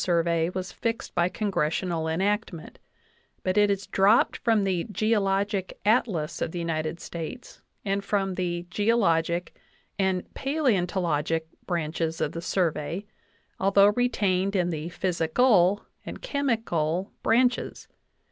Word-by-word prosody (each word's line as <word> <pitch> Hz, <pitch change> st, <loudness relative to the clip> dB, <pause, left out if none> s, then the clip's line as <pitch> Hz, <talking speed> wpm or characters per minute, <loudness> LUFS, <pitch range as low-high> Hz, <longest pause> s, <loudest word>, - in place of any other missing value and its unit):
VIII -, -, -1 dB
Survey 170 Hz, -2 st, +2 dB
was 185 Hz, 0 st, -5 dB
fixed 230 Hz, +3 st, -3 dB
by 175 Hz, +1 st, +2 dB
congressional 175 Hz, -4 st, -1 dB
enactment; 180 Hz, -1 st, -2 dB, 0.6 s
but 185 Hz, -, 0 dB
it 205 Hz, -1 st, +4 dB
is 200 Hz, 0 st, -1 dB
dropped 200 Hz, +4 st, +3 dB
from 225 Hz, -3 st, +2 dB
the 185 Hz, -3 st, 0 dB
"Geologic 200 Hz, -3 st, 0 dB
Atlas 205 Hz, -8 st, +1 dB
of -, -, 0 dB
the 175 Hz, -, -6 dB
United 165 Hz, -1 st, -2 dB
States" 170 Hz, +11 st, -7 dB, 0.2 s
and 200 Hz, 0 st, 0 dB
from 195 Hz, -1 st, 0 dB
the 175 Hz, -1 st, -2 dB
"geologic" 180 Hz, -6 st, +1 dB, 0.4 s
and 190 Hz, -2 st, +1 dB
"paleontologic" 180 Hz, -, 0 dB, 0.2 s
branches 165 Hz, -1 st, -2 dB
of -, -, 0 dB
the 165 Hz, -, -5 dB
Survey, 170 Hz, +1 st, -1 dB, 0.5 s
al 195 Hz, -, +2 dB
though 200 Hz, 0 st, +6 dB
retained 200 Hz, -4 st, +1 dB
in 175 Hz, -2 st, +1 dB
the 160 Hz, +1 st, -4 dB
"physical" 185 Hz, +3 st, +2 dB, 0.2 s
and -, -, -8 dB
"chemical" 200 Hz, -, -1 dB
branches. 245 Hz, +2 st, +1 dB
185 Hz, 125 wpm, -26 LUFS, 170-205 Hz, 0.6 s, though